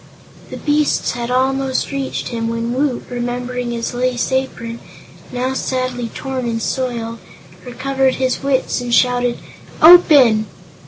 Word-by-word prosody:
The - - -7
beasts 295 0 +1
had 240 0 -4
almost 265 +1 0
reached 275 -1 -3
him 230 -1 -3
when 230 +1 -2
Woot, 265 -1 -1
remembering 245 0 -3
his 235 0 -3
lace 245 0 -1
apron 250 -3 -3 0.5
now 255 +1 -2
sadly 255 -2 -2
torn 265 -2 -4
and 230 -1 -2
soiled 230 -2 -3 0.4
recovered 265 +1 0
his 260 -1 -1
wits 270 -2 0
and 245 -1 -4
shouted: 245 0 +2 0.4
"Open!" 285 -10 +7
250 Hz, 125 wpm, -18 LUFS, 240-265 Hz, 0.5 s, Open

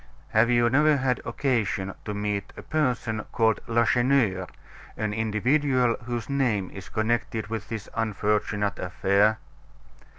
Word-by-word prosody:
"Have 110 +2 +3
you 120 -1 +4
never 150 +4 +4
had 130 -2 0
occasion 110 -6 -1
to 105 - -4
meet 105 -1 -3
a - - -8
person 125 -8 -1
called 110 -2 +2
Lacheneur, 115 -4 +2 0.5
an 110 -1 -1
individual 125 +4 +1
whose 120 -2 -3
name 120 -9 0
is 95 - -10
connected 110 -1 -1
with 110 -2 -5
this 110 -3 -5
unfortunate 105 -2 0
affair?" 100 +5 +2
110 Hz, 125 wpm, -26 LUFS, 105-125 Hz, 0.5 s, you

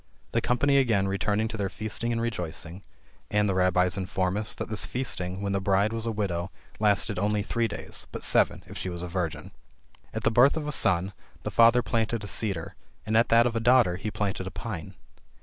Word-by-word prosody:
The 115 - +1
company 140 +4 +2
again 110 -8 +2
returned 105 +3 0
to 110 - -5
their 100 -2 -1
feasting 110 +3 -3
and 115 - -1
rejoicing; 90 -5 -4 0.5
and 105 0 +2
the 100 - +1
Rabbies 90 0 +2
inform 95 0 -1
us, 105 0 +2
that - - -5
this 110 - -2
feasting, 95 -7 -3
when 100 - -1
the 100 0 0
bride, 100 +3 +2
was 115 0 -2
a - - 0
widow, 95 -5 -2 0.3
lasted 105 -1 +2
only 105 +1 0
three 115 +2 0
days, 105 - -6
but - - -6
seven - - +2
if - - -11
she 95 - -3
was 85 -1 -5
a - - -4
virgin. 85 -2 -4 0.6
At - - -5
the - - +3
birth 125 +7 +5
of 150 -2 -3
a - - -1
son, 95 -6 +2 0.3
the - - -3
father 115 +1 +5
planted 115 -1 -1
a - - -5
cedar; 100 -6 -2 0.3
and 110 - -1
at 115 +1 +4
that 115 +1 +5
of 120 -1 -1
a - - +1
daughter, 115 -6 +4
he 105 +3 -4
planted 100 -3 -3
a - - -5
pine. 100 -6 -6
105 Hz, 215 wpm, -27 LUFS, 95-115 Hz, 0.6 s, birth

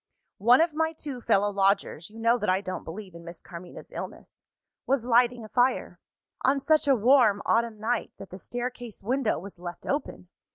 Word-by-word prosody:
"One 240 +8 +6
of 330 -1 +2
my 320 +1 0
two 285 -5 -7
fellow 205 -3 +2
lodgers 195 -4 0
(you 220 - -14
know 230 +2 +2
that 210 - -1
I 185 +1 +3
don't 185 -2 -5
believe 185 +2 -8
in 170 0 -11
Miss 170 0 -9
Carmina's 175 +1 -11
illness) - - -9 0.4
was 265 -3 +1
lighting 240 -1 +3
a - - -9
fire 250 +3 +1 0.4
on 275 +2 +3
such 305 +2 +2
a 275 - +5
warm 235 -3 +5
autumn 230 -2 +1
night, 230 +2 -1
that 195 - -11
the 185 - -8
staircase 245 -1 -6
window 250 +1 0
was 185 +1 -10
left 175 0 -8
open! 285 +2 -3
230 Hz, 190 wpm, -27 LUFS, 195-255 Hz, 0.4 s, One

